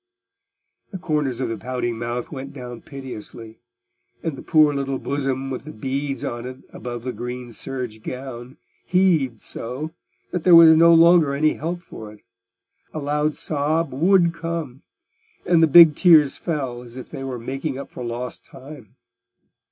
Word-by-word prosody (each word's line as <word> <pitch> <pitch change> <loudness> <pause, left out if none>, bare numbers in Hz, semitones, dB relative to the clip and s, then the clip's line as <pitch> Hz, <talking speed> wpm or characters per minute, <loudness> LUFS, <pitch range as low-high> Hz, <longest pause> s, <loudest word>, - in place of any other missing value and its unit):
The 190 - -5
corners 150 -7 -2
of 130 - -1
the 115 - -4
pouting 125 -2 -3
mouth 120 +1 -4
went 135 -1 -7
down 125 -3 -8
piteously, 115 -4 -9 0.6
and 160 -4 -2
the - - -9
poor 155 -2 +4
little 135 -1 -2
bosom 135 -1 -3
with 130 - -5
the 155 - -9
beads 135 +4 -4
on 120 +1 -4
it 130 0 -10
above 120 -1 -7
the 125 0 -4
green 125 0 -6
serge 125 -3 -6
gown 125 +2 -8 0.3
heaved 160 - +2
so, 130 +7 -6 0.4
that 180 - -2
there 175 +1 +6
was 165 -1 +9
no 170 +1 +6
longer 165 -3 +5
any 155 +2 +2
help 175 +3 -5
for 110 -1 -10
it: 105 - -18 0.7
a - - -7
loud 150 +1 -1
sob 155 0 -1
would 170 +4 +3
come, 165 -6 -5 0.6
and 170 -2 +4
the 165 - +6
big 160 0 +8
tears 155 -6 +5
fell 135 -7 -4
as 120 0 -11
if 130 - -9
they 135 - -6
were 130 -2 -4
making 135 +4 -4
up 140 - -8
for 125 - -7
lost 120 +1 -5
time. 135 -5 -13
135 Hz, 165 wpm, -22 LUFS, 125-155 Hz, 0.7 s, was